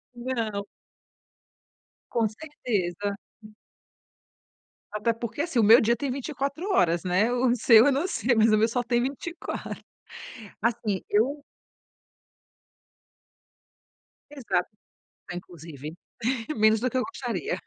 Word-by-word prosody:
Não. 230 -5 -3 1.4
Com 230 -3 +1
certeza. 205 - -3 1.7
Até 215 +2 0
porque, 235 +4 -4
assim, 320 -6 0
o 225 - +5
meu 225 +4 +8
dia 235 +2 +3
tem 275 +4 -3
24 280 +4 -3
horas, 170 - +2
né. 185 +6 +2
O 245 0 +2
seu 230 -1 +7
eu - - +5
não 280 +7 0
sei, 245 -8 +1
mas 220 0 +4
o 215 - +5
meu 220 +1 +4
só 245 +2 -1
tem 240 0 +1
24. 285 +7 -5 0.8
Assim 220 -4 0
eu 270 +8 +1 2.9
Exato, 210 -11 -1 0.6
inclusive 165 -4 -8 0.6
menos 215 0 +4
do 255 +2 0
que 260 - -4
eu 255 - +2
gostaria. 275 - -3
230 Hz, 110 wpm, -26 LUFS, 205-260 Hz, 2.9 s, meu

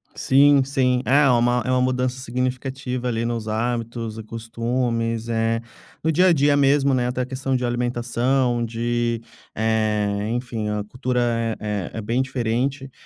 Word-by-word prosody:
Sim, 140 +1 +5
sim, 130 -2 +1
ah, 145 +3 +5
é - - +5
uma 120 0 +3
uma 130 0 +1
mudança 130 0 0
significativa 125 0 -3
ali 115 -1 -1
nos 115 -2 -3
hábitos 115 0 -2
e - - -6
costumes, 115 0 -2
eh, 115 0 0 0.4
no 160 - +2
dia 180 +4 +4
a 180 - +6
dia 145 -1 +3
mesmo, 140 0 +3
né, 125 -1 +1
até 125 +1 -2
a - - -1
questão 130 +1 -2
de 125 -1 0
alimentação, 120 +1 0
de, 120 0 -1 0.3
eh, 105 -2 0
enfim, 115 -2 -3
a 105 0 -2
cultura 120 -1 -1
é 105 -4 -3
é 110 - -4
bem 115 +5 0
diferente, 130 +1 -2
120 Hz, 155 wpm, -22 LUFS, 115-130 Hz, 0.4 s, a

